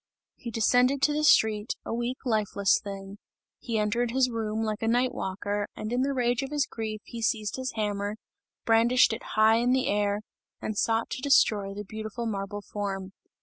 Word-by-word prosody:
He 235 Hz, -, -7 dB
descended 245 Hz, +4 st, +3 dB
to 295 Hz, +1 st, +4 dB
the 305 Hz, +1 st, 0 dB
street, 220 Hz, -6 st, +4 dB
a -, -, -3 dB
weak, 240 Hz, +2 st, -2 dB
lifeless 205 Hz, -3 st, +2 dB
thing; 195 Hz, 0 st, -8 dB, 0.4 s
he 230 Hz, -2 st, -3 dB
entered 225 Hz, +3 st, +1 dB
his 255 Hz, +1 st, +2 dB
room 220 Hz, -1 st, -2 dB
like 215 Hz, -1 st, -2 dB
a 225 Hz, -, -1 dB
night 245 Hz, +2 st, +2 dB
walker, 205 Hz, +2 st, -3 dB
and 215 Hz, +2 st, -4 dB
in 250 Hz, -, +1 dB
the 275 Hz, +1 st, +1 dB
rage 245 Hz, -3 st, +1 dB
of 270 Hz, -, -4 dB
his 295 Hz, -1 st, +1 dB
grief, 215 Hz, -2 st, -5 dB
he 235 Hz, -1 st, -7 dB
seized 215 Hz, -1 st, 0 dB
his 260 Hz, 0 st, -4 dB
hammer, 205 Hz, -1 st, -2 dB, 0.5 s
brandished 235 Hz, +2 st, +4 dB
it 225 Hz, -, -5 dB, 0.2 s
high 220 Hz, +1 st, +6 dB
in 245 Hz, +2 st, +2 dB
the 260 Hz, 0 st, +2 dB
air 205 Hz, 0 st, 0 dB, 0.4 s
and 215 Hz, -, -4 dB
sought 225 Hz, +2 st, 0 dB
to -, -, -4 dB
destroy 205 Hz, -8 st, +3 dB
the 205 Hz, -, -5 dB
beautiful 220 Hz, +3 st, -5 dB
marble 205 Hz, -1 st, -4 dB
form. 195 Hz, -2 st, -4 dB
220 Hz, 190 wpm, -27 LUFS, 205-245 Hz, 0.5 s, high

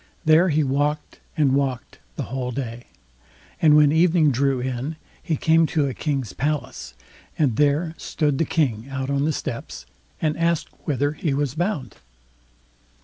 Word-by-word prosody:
There 160 Hz, +4 st, +5 dB
he 155 Hz, 0 st, +2 dB
walked 145 Hz, +2 st, -1 dB, 0.2 s
and 145 Hz, -4 st, +3 dB
walked 135 Hz, -3 st, -2 dB, 0.2 s
the -, -, -3 dB
whole 130 Hz, 0 st, -4 dB
day, 120 Hz, -2 st, -5 dB, 0.8 s
and 155 Hz, -2 st, +6 dB
when 150 Hz, -1 st, +6 dB
evening 160 Hz, -1 st, +4 dB
drew 135 Hz, +1 st, +1 dB
in, 130 Hz, +4 st, -3 dB, 0.3 s
he 160 Hz, -4 st, -1 dB
came 160 Hz, +2 st, +3 dB
to 155 Hz, -3 st, +1 dB
a 135 Hz, -, -2 dB
king's 135 Hz, -8 st, -3 dB
palace, 140 Hz, -, -3 dB, 0.4 s
and 135 Hz, -8 st, +2 dB
there 150 Hz, +4 st, +2 dB
stood 145 Hz, -4 st, -1 dB
the 165 Hz, -, +2 dB
King 130 Hz, -7 st, -1 dB
out 135 Hz, 0 st, -3 dB
on 140 Hz, +1 st, +1 dB
the 155 Hz, -, +1 dB
steps, 120 Hz, -5 st, -5 dB, 0.3 s
and 155 Hz, -1 st, 0 dB
asked 170 Hz, -1 st, +1 dB, 0.2 s
whither 145 Hz, -1 st, 0 dB
he 150 Hz, -2 st, -2 dB
was 140 Hz, -2 st, -1 dB
bound. 155 Hz, -, -3 dB
145 Hz, 155 wpm, -23 LUFS, 130-155 Hz, 0.8 s, and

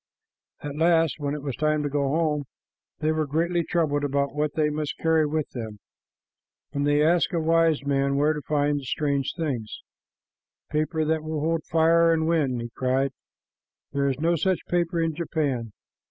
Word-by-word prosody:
At 145 Hz, 0 st, -5 dB
last, 165 Hz, -1 st, +3 dB
when 145 Hz, 0 st, -2 dB
it 150 Hz, -, -7 dB
was 140 Hz, -4 st, -3 dB
time 155 Hz, 0 st, +1 dB
to 145 Hz, -, -1 dB
go 140 Hz, -1 st, 0 dB
home, 150 Hz, -1 st, 0 dB, 0.6 s
they 155 Hz, -, +2 dB
were 155 Hz, -1 st, 0 dB
greatly 170 Hz, +4 st, 0 dB
troubled 155 Hz, -4 st, 0 dB
about 140 Hz, 0 st, 0 dB
what 150 Hz, 0 st, -1 dB
they 150 Hz, -1 st, +2 dB
must 150 Hz, -1 st, -3 dB
carry 160 Hz, -1 st, +2 dB
with 155 Hz, 0 st, -1 dB
them, 110 Hz, -4 st, -6 dB, 1.0 s
and 145 Hz, 0 st, 0 dB
they 145 Hz, +1 st, +3 dB
asked 170 Hz, +2 st, +2 dB
a 170 Hz, -, +1 dB
wise 165 Hz, -2 st, +2 dB
man 140 Hz, 0 st, +1 dB
where 150 Hz, +2 st, +3 dB
to 150 Hz, -, -5 dB
find 145 Hz, +1 st, 0 dB
the -, -, -10 dB
strange 140 Hz, 0 st, -1 dB
things. 130 Hz, -10 st, -4 dB, 0.9 s
"Paper 155 Hz, +1 st, 0 dB
that 160 Hz, 0 st, +1 dB
will 155 Hz, -1 st, -3 dB
hold 165 Hz, 0 st, 0 dB
fire 165 Hz, +1 st, +4 dB
and 160 Hz, -1 st, +1 dB
wind!" 145 Hz, -7 st, +1 dB
he 120 Hz, 0 st, -6 dB
cried. 130 Hz, +1 st, +1 dB, 0.8 s
"There 140 Hz, 0 st, +1 dB
is 130 Hz, -, -2 dB
no 170 Hz, +2 st, +2 dB
such 185 Hz, +3 st, 0 dB
paper 175 Hz, -1 st, 0 dB
in 165 Hz, -1 st, 0 dB
Japan." 145 Hz, -8 st, -2 dB
150 Hz, 180 wpm, -25 LUFS, 140-160 Hz, 1.0 s, fire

